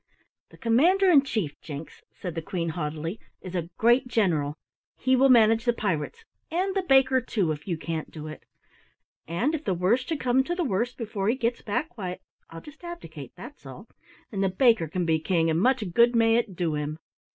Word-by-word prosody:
"The - - -17
Commander 350 +12 +4
in 290 -5 +7
Chief, 215 - -3
Jinks," 150 0 -8
said 180 -3 -6
the 165 - -3
Queen 170 -1 -3
haughtily, 160 +4 -4 0.2
"is 185 - -9
a 170 -2 -3
great 240 +3 +4
general. 165 -11 +1 0.4
He 260 +1 +2
will 270 +1 +4
manage 225 -2 +5
the 240 -1 +2
pirates 215 - -3 0.2
and 370 +4 -1
the 385 - +2
baker, 265 -5 +4
too, 200 -9 -1
if 150 +3 -6
you 170 -3 -1
can't 160 -1 -4
do 155 -1 -9
it. 155 - -9 0.8
And 215 - 0
if 315 -1 -3
the 190 - 0
worst 220 - +1
should 320 -3 -1
come 255 +1 +2
to 345 - -2
the 355 - -1
worst 240 - -1
before 210 -3 -2
he 235 - +2
gets 240 -2 -1
back, 245 +9 -3
why 180 -2 -4 0.3
I'll 165 0 -9
just 300 +3 -14
abdicate, 165 - -9
that's 255 - -11
all, 145 - -11 0.4
and 195 -2 -1
the 195 - +2
baker 225 -2 +3
can 175 +3 -2
be 160 -1 +2
king 165 -1 +1
and 160 +2 +1
much 255 0 +3
good 235 +3 +5
may 225 -1 +4
it 230 -6 -2
do 170 -3 -1
him." 150 +1 -3
215 Hz, 205 wpm, -26 LUFS, 165-255 Hz, 0.8 s, in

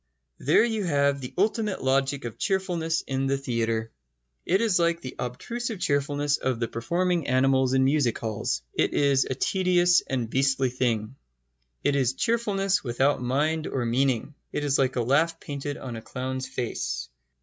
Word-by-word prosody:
There - - +4
you 220 -3 -1
have 140 -3 +2
the 125 - -6
ultimate 210 - 0
logic 135 0 +1
of 115 - -7
cheerfulness 175 -5 0
in 135 0 -2
the 135 0 +1
theatre. 115 -4 -1 0.6
It 190 +3 +3
is 210 -6 +2
like 170 0 +2
the 130 - -6
obtrusive 220 - -4
cheerfulness 145 -1 +1
of 130 -3 -1
the 115 - 0
performing 170 +8 -1
animals 130 0 +3
in 130 - +4
music 135 -3 +2
halls. 105 - -2
It - - 0
is 140 -2 +3
a 130 - -1
tedious 180 +3 +3
and 125 -4 -1
beastly 135 +1 +1
thing. 120 -1 -1 0.7
It 145 - +2
is 130 -3 +2
cheerfulness 205 - +1
without 130 +2 +1
mind 150 +6 0
or 130 -3 -2
meaning. 130 +3 0 0.2
It 150 - -2
is 145 -1 +1
like 130 -1 +1
a 125 - +1
laugh 160 +7 +2
painted 145 0 -5
on 125 -3 -6
a 115 - -6
clown's 130 +2 -4
face. 65 - -3
135 Hz, 165 wpm, -26 LUFS, 125-165 Hz, 0.7 s, There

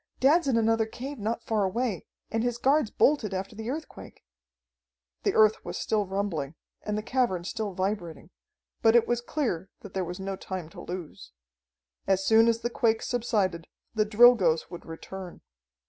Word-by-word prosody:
Dad's 290 +4 +4
in 255 -4 +2
another 225 0 +2
cave 260 +4 -7
not 225 +3 -2
far 215 -2 +1
away, 205 -1 -2 0.2
and 225 - 0
his 240 0 -1
guards 275 -1 +2
bolted 220 -9 +2
after 195 +3 -4
the 220 +2 -5
earthquake." 305 - -8 1.0
The - - 0
earth 215 0 +4
was - - -5
still 210 -3 0
rumbling, 180 -7 -2 0.3
and 210 0 -3
the 215 - -3
cavern 235 -8 0
still 210 +1 -4
vibrating, 185 -3 -3 0.5
but 225 0 +5
it 235 - +5
was 240 0 0
clear 230 - -2
that 200 - -11
there 190 - -1
was 180 +2 -6
no 195 0 -3
time 185 -4 -6
to - - -11
lose. 160 - -8 0.7
As 195 0 +2
soon 225 +2 +6
as 230 0 +2
the 240 - -1
quake 225 -2 +1
subsided 205 -8 -1 0.3
the 220 -2 +2
Drilgoes 210 -8 +5
would 175 - -9
return. 180 +2 -8
215 Hz, 170 wpm, -28 LUFS, 185-235 Hz, 1.0 s, soon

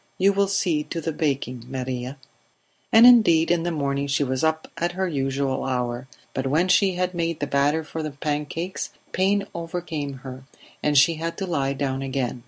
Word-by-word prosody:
You 195 +2 +4
will 200 0 +2
see 185 -6 +1
to 165 - -4
the 165 0 -2
baking, 135 -6 -2
Maria." 130 0 -4 0.7
And 225 +2 +8
indeed 175 -10 +6
in 175 -1 +2
the 175 - -1
morning 140 -2 -1
she 140 +1 +1
was 130 0 -2
up 160 0 0
at 175 +1 -1
her 190 +1 -1
usual 135 -3 -1
hour, 125 -1 -2 0.3
but 135 0 -2
when 165 +7 +2
she 190 +1 +4
had 180 0 -1
made 170 -2 -2
the 145 - -1
batter 145 +3 +1
for 160 +1 -5
the 155 - -3
pancakes 150 +5 -3 0.2
pain 200 +2 +1
overcame 165 -4 -4
her, 130 0 -8 0.4
and 150 -1 +2
she 155 +4 +5
had 165 +1 -4
to 195 - -2
lie 140 -6 0
down 135 -1 -2
again. 130 -2 -2
150 Hz, 190 wpm, -24 LUFS, 135-175 Hz, 0.7 s, And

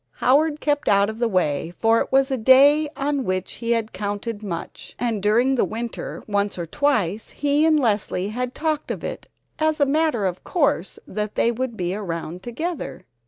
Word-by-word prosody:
Howard 295 +4 +2
kept 290 -1 0
out 200 +1 +4
of 220 - -11
the 240 - +2
way, 175 -4 0
for 225 0 +3
it - - -4
was 270 +1 +3
a 265 - +1
day 280 +6 +6
on 280 -1 -1
which 185 -3 -2
he 230 - -3
had 225 -1 -2
counted 205 +1 -4
much, 190 -6 -7
and 230 -4 -1
during 235 +6 +3
the 260 - +2
winter 230 +1 -5
once 205 -1 -1
or 170 - -3
twice 220 - 0
he 290 +2 +2
and 310 -1 +4
Leslie 205 -5 0
had 250 +3 -3
talked 310 -1 -2
of - - -4
it - - -6 0.3
as 315 0 +1
a 285 - +5
matter 290 -6 +1
of 185 -1 -3
course 280 - 0
that 210 +1 -4
they 235 - +3
would 240 -1 -3
be 180 0 -1
around 175 -3 -5
together. 240 - -5
230 Hz, 190 wpm, -23 LUFS, 200-285 Hz, 0.3 s, day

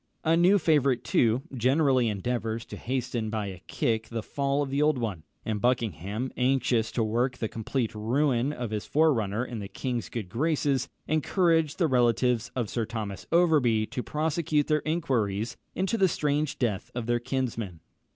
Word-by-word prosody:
A 160 0 +3
new 180 +4 +5
favourite, 140 -7 +2
too, 120 +2 +2
generally 130 0 +3
endeavours 115 +2 -2
to - - -8
hasten 125 -3 -2
by 110 -1 -2
a 95 -3 -7
kick 110 -1 -1
the 115 -2 -4
fall 140 +2 0
of 135 - -5
the 140 +1 +1
old 150 -2 +3
one; 105 -9 -3 0.2
and 105 -2 -2
Buckingham, 115 - -1
anxious 125 -3 +1
to 115 - +1
work 120 +4 0
the 110 - -2
complete 115 +2 -2
ruin 125 +4 +1
of 120 -6 -5
his 105 -4 -3
forerunner 120 -8 +2
in 120 -3 -6
the 100 - -5
king's 125 +2 -3
good 115 -6 -4
graces, 140 - 0 0.2
encouraged 160 0 +2
the 175 - +3
relatives 125 -3 +2
of 120 -4 -1
Sir 115 +1 -2
Thomas 105 -4 -5
Overbury 150 -11 +4
to 125 - -2
prosecute 150 0 0
their 150 -1 +1
inquiries 120 - 0 0.2
into 195 +4 0
the 190 - +5
strange 150 -3 0
death 110 -7 -1
of 120 -2 -3
their 120 0 +1
kinsman. 120 -8 -3
125 Hz, 170 wpm, -27 LUFS, 110-145 Hz, 0.2 s, new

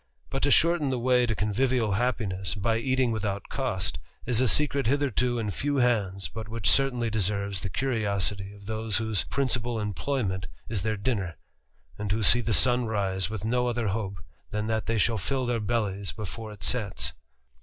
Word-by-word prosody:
But 135 - -2
to 145 - +3
shorten 165 -1 +4
the 130 - 0
way 125 0 +3
to 110 - 0
convivial 110 +2 +1
happiness, 100 -4 -1
by 110 +3 +1
eating 130 0 +1
without 100 -2 -3
cost, 95 - -2 0.3
is 125 -1 +2
a 130 - +4
secret 140 +1 +2
hitherto 125 -3 +1
in 110 -3 -1
few 145 +9 -1
hands, 105 -7 +1
but 110 -1 -7
which 115 +1 -2
certainly 125 -4 +2
deserves 100 -2 -1
the 100 - -3
curiosity 100 -5 -1
of 100 -1 -14
those 110 0 -1
whose 110 -2 0
principal 120 -4 0
employment 105 - -2 0.2
is 110 -4 -2
their 110 +2 -1
dinner, 100 -6 -2 0.6
and 105 -1 -2
who 110 +2 0
see 120 +4 +7
the 115 - -2
sun 125 +3 +4
rise 95 -4 -1
with 110 -2 -5
no 125 +2 +1
other 120 -3 0
hope 100 -1 -3 0.3
than 105 0 -2
that 110 -2 -1
they 115 0 +1
shall 110 +1 +2
fill 130 +6 -1
their 120 -1 0
bellies 100 -4 -1
before 110 +1 -6
it 100 -6 -11
sets. 105 +1 0
110 Hz, 180 wpm, -27 LUFS, 100-125 Hz, 0.6 s, see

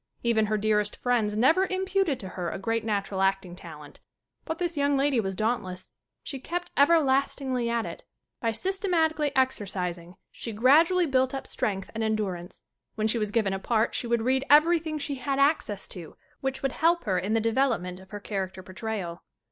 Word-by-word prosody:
Even 225 -2 +2
her 215 0 +1
dearest 210 0 +1
friends 225 -4 0
never 325 - +4
imputed 380 -6 0
to 190 - -7
her 180 -2 -4
a - - -4
great 225 +3 -1
natural 200 -3 -1
acting 195 -2 0
talent. 150 -5 -11 0.5
But 320 - -3
this 345 -1 -2
young 285 -1 +2
lady 275 -2 +2
was 195 -3 -2
dauntless. 190 -4 -2 0.3
She 275 - -5
kept 350 +6 -4
everlastingly 275 -4 +2
at 235 -1 0
it. - - -7 0.4
By 230 - 0
systematically 325 - 0
ex 260 0 +2
ercising 180 -3 -4 0.2
she 230 - -6
gradually 320 - +5
built 260 -2 +1
up 270 - -5
strength 195 -2 -3
and 225 - -2
endurance. 200 -5 -3 0.3
When 215 - -1
she 230 +1 +1
was 210 -1 -1
given 210 -3 +1
a 195 - -2
part 225 +2 +1
she 240 - -2
read 240 +3 +1
everything 315 +1 +4
she 285 -1 -3
had 270 +2 -1
access 275 -8 +1
to 170 -4 -7 0.2
which 270 0 -3
would 270 - +1
help 335 +4 +2
her 190 -5 +1
in 200 +5 -1
the - - +4
development 220 -6 0
of 190 0 -15
her 205 - -6
character 190 -2 -4
portrayal. 185 -3 -5
230 Hz, 180 wpm, -27 LUFS, 195-280 Hz, 0.5 s, gradually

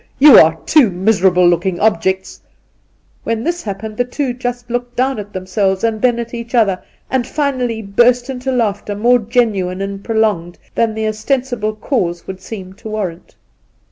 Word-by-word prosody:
you 285 -3 +9
are 160 0 +5
two 290 -8 +5
miserable 185 -1 +3
looking 175 +1 +1
objects 190 -2 0 0.3
!' - - -41
— - - -39
when 230 0 -2
this 345 +3 -2
happened 215 +1 -6
the 245 - +2
two 250 +1 -3
just 245 0 -4
looked 245 0 -3
down 260 -1 0
at 205 0 -8
them 185 -1 -6
selves 190 0 0
and 225 -2 0
then 245 -2 +3
at 235 0 -5
each 235 +1 -5
other, 200 -6 +2 0.3
and 255 -2 0
finally 255 -6 -1
burst 240 +5 +3
into 265 0 -3
laughter 210 -4 -1
more 240 +4 +3
genuine 205 -6 0
and 195 0 -5
prolonged 215 -7 0 0.2
than 225 -2 0
the 220 0 -1
ostensible 220 0 -1
cause 185 -7 -2
would 190 -1 -8
seem 190 -3 -8
to 215 +3 -10
warrant. 190 -5 -5
220 Hz, 175 wpm, -17 LUFS, 195-245 Hz, 0.3 s, you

